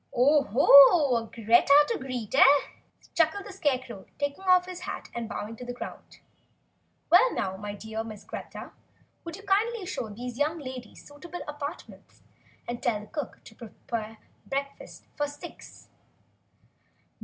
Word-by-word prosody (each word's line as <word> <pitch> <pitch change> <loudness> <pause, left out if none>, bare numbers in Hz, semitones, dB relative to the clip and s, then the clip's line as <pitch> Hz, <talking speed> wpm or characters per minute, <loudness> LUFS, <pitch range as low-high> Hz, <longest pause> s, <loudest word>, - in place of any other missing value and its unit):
"Oho 280 - +6
a 230 -1 -2
Greta 235 +7 +4
to - - -1
greet, 255 -5 -6
eh?" 270 - +7 0.7
chuckled 335 +5 +1
the 405 - -9
Scarecrow, 255 - -2
taking 285 +5 -3
off 365 -1 +5
his 365 -1 -8
hat 365 - -7
and 235 -1 -5
bowing 215 +2 -6
to 250 - -9
the 245 0 -6
ground. - - -9 0.9
"Well, - - +6
now, 190 0 -2
my 205 +1 -6
dear 220 +1 -5
Miss 215 -2 -10
Greta, - - -9 0.5
will 335 - -7
you 400 - -13
kindly 415 +2 0
show 245 -11 -4
these 240 +4 -7
young 305 +3 0
ladies 255 -6 -9
to - - -20
suitable 345 +4 -9
apartments, 295 +2 -9 0.4
and 240 0 -5
tell 225 -3 0
the - - -11
cook 290 +5 -7
to - - -14
prepare 225 0 -7 0.3
breakfast 280 +1 -5
for 290 - -1
six." 290 0 -12
270 Hz, 150 wpm, -27 LUFS, 225-310 Hz, 0.9 s, eh